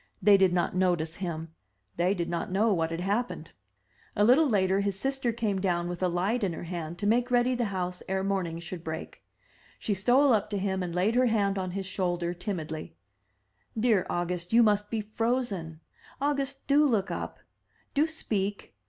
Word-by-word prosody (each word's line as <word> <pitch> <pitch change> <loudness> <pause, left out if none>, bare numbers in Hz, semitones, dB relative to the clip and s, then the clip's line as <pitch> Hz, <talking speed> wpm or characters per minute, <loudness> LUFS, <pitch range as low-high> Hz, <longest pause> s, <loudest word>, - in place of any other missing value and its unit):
They 200 +1 +6
did 190 -2 +4
not 175 0 0
notice 175 -3 +1
him; 165 -3 -5 0.4
they 180 +3 +2
did 170 -2 -2
not 170 +3 -3
know 210 +3 +3
what 165 -3 0
had 165 +1 -3
happened. 200 -3 -2 0.6
A 205 - +3
little 270 +7 +5
later 190 -3 +2
his 200 -1 -1
sister 270 0 0
came 215 -4 -1
down 175 -2 0
with 175 0 -5
a 185 - +3
light 190 +7 0
in 185 -4 0
her - - -6
hand 170 -1 -5
to 205 - -4
make 240 +4 +2
ready 245 +1 +3
the 240 -1 0
house 180 -3 -3
ere 190 0 0
morning 190 -4 -1
should 170 0 -7
break. 160 -1 -6 0.5
She 210 - -1
stole 245 +8 +4
up 210 -1 +1
to 205 - -2
him 190 -1 -1
and 175 -1 -4
laid 190 +5 +2
her 250 +1 +4
hand 200 -3 +1
on 185 -1 -2
his 195 - -3
shoulder 175 -2 -1
timidly. 170 -4 -5 0.8
"Dear 215 -5 +3
August, 175 +1 -2
you 235 +1 +7
must 210 -1 +2
be 225 -2 -1
frozen. 210 -7 -2 0.4
August, 280 -1 -1
do 290 +2 +4
look 210 -6 0
up! - - -4 0.6
do 295 +3 +3
speak! 205 - -3
195 Hz, 190 wpm, -28 LUFS, 175-225 Hz, 0.8 s, you